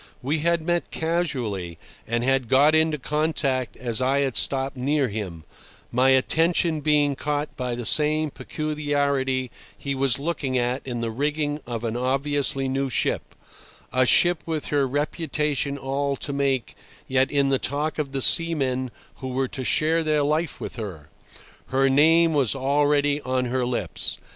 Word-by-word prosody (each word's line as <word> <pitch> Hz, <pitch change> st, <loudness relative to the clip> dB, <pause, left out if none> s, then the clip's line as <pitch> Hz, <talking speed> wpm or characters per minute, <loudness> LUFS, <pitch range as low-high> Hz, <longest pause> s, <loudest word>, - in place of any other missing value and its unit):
We 150 Hz, +5 st, 0 dB
had 170 Hz, +1 st, +1 dB
met 175 Hz, +1 st, -1 dB
casually, 125 Hz, -, -2 dB, 0.3 s
and 120 Hz, +1 st, -1 dB
had 135 Hz, -1 st, +1 dB
got 140 Hz, +5 st, +4 dB
into 155 Hz, -1 st, +3 dB
contact 140 Hz, -5 st, -1 dB
as 120 Hz, -2 st, -1 dB
I 135 Hz, +2 st, +2 dB
had 135 Hz, -3 st, -1 dB
stopped 135 Hz, 0 st, +2 dB
near 135 Hz, +1 st, 0 dB
him, 95 Hz, -6 st, -6 dB, 0.5 s
my 130 Hz, +2 st, +3 dB
attention 160 Hz, +4 st, +2 dB
being 145 Hz, -1 st, +2 dB
caught 145 Hz, +1 st, -3 dB
by 125 Hz, -1 st, -3 dB
the 120 Hz, -1 st, -5 dB
same 155 Hz, +3 st, +3 dB
peculiarity 140 Hz, -5 st, -1 dB, 0.3 s
he 140 Hz, -, -3 dB
was 135 Hz, -2 st, +1 dB
looking 140 Hz, -3 st, -2 dB
at 125 Hz, +2 st, 0 dB
in 120 Hz, -2 st, -3 dB
the 115 Hz, -1 st, -2 dB
rigging 145 Hz, +4 st, -1 dB
of 120 Hz, -2 st, -4 dB
an 115 Hz, -1 st, -2 dB
obviously 135 Hz, +2 st, 0 dB
new 135 Hz, +1 st, -1 dB
ship, -, -, -1 dB, 0.6 s
a 130 Hz, -1 st, +3 dB
ship 175 Hz, +3 st, +4 dB
with 160 Hz, -2 st, -3 dB
her 140 Hz, -2 st, +1 dB
reputation 145 Hz, 0 st, -1 dB
all 140 Hz, +1 st, -2 dB
to 140 Hz, -, -5 dB
make 135 Hz, -3 st, -1 dB, 0.3 s
yet 130 Hz, 0 st, +2 dB
in 140 Hz, -1 st, +1 dB
the 135 Hz, -1 st, +2 dB
talk 150 Hz, +3 st, -2 dB
of 145 Hz, -3 st, -2 dB
the 135 Hz, -2 st, 0 dB
seamen 135 Hz, -6 st, +2 dB, 0.3 s
who 130 Hz, -, -6 dB
were 130 Hz, 0 st, -1 dB
to 130 Hz, -, -5 dB
share 160 Hz, +5 st, +2 dB
their 155 Hz, -2 st, +1 dB
life 155 Hz, +2 st, -1 dB
with -, -, -7 dB
her. 85 Hz, -9 st, -7 dB, 0.6 s
Her 135 Hz, +1 st, +2 dB
name 160 Hz, +4 st, +4 dB
was 140 Hz, -4 st, +2 dB
already 145 Hz, +2 st, +1 dB
on 130 Hz, -1 st, -1 dB
their 130 Hz, -1 st, 0 dB
lips. 110 Hz, -9 st, -2 dB
140 Hz, 160 wpm, -24 LUFS, 130-150 Hz, 0.6 s, got